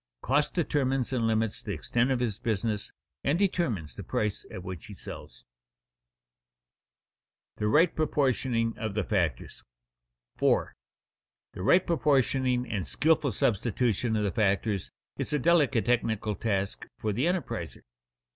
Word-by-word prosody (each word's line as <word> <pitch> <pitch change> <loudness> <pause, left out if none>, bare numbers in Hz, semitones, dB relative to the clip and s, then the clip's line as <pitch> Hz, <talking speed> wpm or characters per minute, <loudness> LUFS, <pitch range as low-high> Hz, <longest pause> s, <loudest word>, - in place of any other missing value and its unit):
Cost 145 +3 +1
determines 135 -6 0
and 115 -3 +1
limits 110 -1 0
the - - -4
extent 120 +2 0
of 130 -2 +1
his 110 -5 -1
business 110 -1 -1 0.3
and 145 +4 +2
determines 130 - 0
the - - -8
price 105 -2 -2
at 90 - -7
which 90 -4 -7
he - - -9
sells. - - -10 2.1
[Sidenote: - - -43
The 105 - 0
right 160 +9 +4
proportioning 130 -6 +1
of 110 -3 -3
the 105 - +1
factors] 85 - -2 0.7
4. - - +2 0.8
_The 90 - -5
right 180 - +5
proportioning 130 -5 +2
and 100 -9 -3
skilful 155 -3 +2
substitution 115 +1 +1
of 105 - +1
the 100 - 0
factors 100 0 0 0.3
is - - -3
a - - +3
delicate 145 -6 +3
technical 110 -3 +1
task 100 -2 -2
for 105 -1 -2
the 125 +8 0
enterpriser. 170 - -2
115 Hz, 135 wpm, -28 LUFS, 105-135 Hz, 2.1 s, right